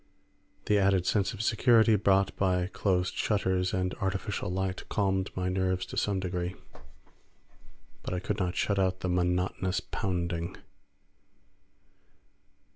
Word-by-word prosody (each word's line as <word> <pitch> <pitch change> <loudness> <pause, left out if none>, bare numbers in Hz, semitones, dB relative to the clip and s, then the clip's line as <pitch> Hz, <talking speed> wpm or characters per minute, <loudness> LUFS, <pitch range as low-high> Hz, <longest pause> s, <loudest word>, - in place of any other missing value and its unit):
The 105 -1 +3
added 95 -2 +3
sense 100 +2 +1
of 110 -2 -5
security 115 0 +4
brought 100 -1 +2
by 90 -2 +1
closed 90 -2 0
shutters 95 -3 0
and 90 0 -1
artificial 95 +1 -2
light 95 0 -2
calmed 95 -2 0
my 90 0 -1
nerves 95 0 0
to - - -9
some 100 -2 0
degree, 90 -1 -3 1.5
but - - -6
I 90 - -1
could 105 +3 -3
not 90 -2 -1
shut 100 -1 +1
out 95 -1 0
the 90 - -1
monotonous 90 +1 0
pounding. 85 -2 -3
95 Hz, 125 wpm, -29 LUFS, 90-100 Hz, 1.5 s, security